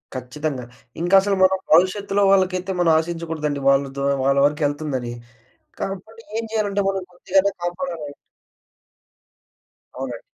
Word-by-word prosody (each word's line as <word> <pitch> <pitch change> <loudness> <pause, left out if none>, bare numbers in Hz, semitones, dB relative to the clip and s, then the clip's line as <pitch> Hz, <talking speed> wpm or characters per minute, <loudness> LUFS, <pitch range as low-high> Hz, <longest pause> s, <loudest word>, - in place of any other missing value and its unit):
ఖచ్చితంగా. 130 +1 -4 0.4
ఇంకసలు 195 +3 +4
మనం 190 0 +4 0.2
భవిష్యత్తులో 195 +3 +3
వాళ్ళకైతే 185 -1 +2
మనం 170 -2 +4
ఆశించకూడదండి. 160 -4 -3
వాళ్ళ 140 0 +4
ద్వా 140 0 0 0.2
వాళ్ళ 140 0 +3
వరకు 150 +2 0
వెళ్తుందని. 140 -5 -3 0.7
కాబట్టి 220 +4 -6 0.2
ఏం 230 - -3
చేయాలంటే 205 -2 0
మనం 195 -1 -2
కొద్దిగన్న 190 +2 +2
కాపాడాలండి. 175 -4 -4 1.8
అవునండి. 125 -3 -5
175 Hz, 110 wpm, -22 LUFS, 145-195 Hz, 1.8 s, ఇంకసలు